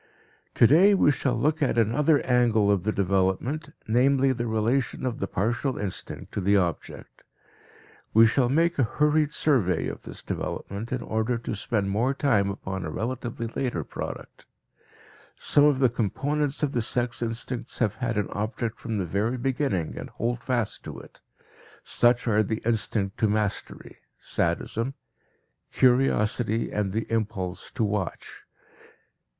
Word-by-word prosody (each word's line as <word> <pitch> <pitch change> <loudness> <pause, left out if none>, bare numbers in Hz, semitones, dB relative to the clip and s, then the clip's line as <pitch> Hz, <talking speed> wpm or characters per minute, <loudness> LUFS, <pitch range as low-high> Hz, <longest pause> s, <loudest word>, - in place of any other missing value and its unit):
Today 170 - +6
we 150 - +4
shall 130 -3 0
look 150 +7 0
at 135 -4 +1
another 140 +7 +3
angle 115 -5 +3
of 100 -3 +2
the 110 - +2
development, 100 - 0 0.2
namely 135 +4 +3
the 120 -1 -3
relation 115 +5 0
of 125 -2 -2
the 100 - -2
partial 120 +8 -1
instinct 100 -3 -5
to 100 - -3
the 100 +2 +3
object. 85 -5 -3 0.9
We 115 +1 +7
shall 120 +2 +2
make 165 +4 +2
a - - +5
hurried 150 +5 +2
survey 120 - +1
of - - -6
this - - -8
development 100 +4 -5
in 125 -2 -2
order 110 +2 -1
to 115 - -5
spend 100 -1 -1
more 120 +7 +1
time 110 -9 +2
upon 95 -1 -5
a 80 - -4
relatively 120 +4 -4
later 115 - -2
product. - - -8 0.9
Some 145 - +3
of 145 -2 +4
the 130 -1 +4
components 140 +6 -1
of 145 - +1
the 120 - 0
sex 120 +1 0
instincts 120 +1 -3
have 105 -4 0
had 120 -3 -2
an 105 - 0
object 110 +2 -3
from 115 -2 -3
the 95 - -1
very 105 +8 -1
beginning 125 - -1
and - - -7
hold 120 +2 -3
fast 120 -5 -1
to - - -7
it; - - -14 0.6
such 120 0 +2
are 110 -1 +3
the 110 +1 -2
instinct 110 -3 0
to 110 - +3
mastery 105 -1 -3 0.2
(sadism), 120 +5 -2 0.8
curiosity, 120 -3 +2
and 105 -2 -1
the 110 +3 -2
impulse 100 -5 -2
to 125 - 0
watch. 105 -3 -3
115 Hz, 150 wpm, -26 LUFS, 105-130 Hz, 0.9 s, We